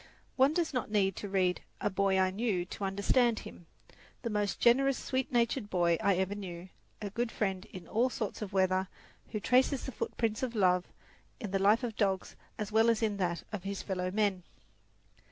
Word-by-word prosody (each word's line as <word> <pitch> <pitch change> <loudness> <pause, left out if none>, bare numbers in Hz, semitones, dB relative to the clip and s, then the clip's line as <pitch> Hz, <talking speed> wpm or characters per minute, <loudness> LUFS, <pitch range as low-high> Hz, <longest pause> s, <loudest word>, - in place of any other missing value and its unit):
One 265 +2 +5
does 340 -4 0
not 250 -4 -2
need 195 -3 +2
to 205 - -5
read 185 -2 +1 0.2
"A 205 - 0
Boy 195 0 +2
I 185 0 +3
Knew" 195 -3 -1
to 190 - -7
understand 220 +5 +2
him 170 - -12 0.6
the 235 - -2
most 205 -1 -1
generous, 270 +3 +4
sweet 260 -1 -2
natured 235 -2 +1
boy 170 -3 +2
I 200 -3 +3
ever 190 +2 0
knew, 185 -3 -7 0.3
a 200 - -4
good 235 +2 -1
friend 190 -3 -2
in 185 -2 -10
all 240 +4 +2
sorts 220 -4 -4
of 205 -2 -4
weather, 190 -1 +2 0.4
who 215 - -3
traces 255 +4 +2
the 265 - -4
footprints 225 -1 -2
of 250 -3 -2
love 180 -3 +3 0.5
in 210 - -5
the 195 - +1
life 210 +5 +4
of 230 -3 -3
dogs 195 -3 0 0.2
as 210 -1 -4
well 225 +2 +4
as 230 0 +2
in 210 -2 0
that 175 -3 -1
of 210 -4 -4
his 195 +1 -4
fellowmen. 190 +1 0
205 Hz, 190 wpm, -31 LUFS, 190-230 Hz, 0.6 s, One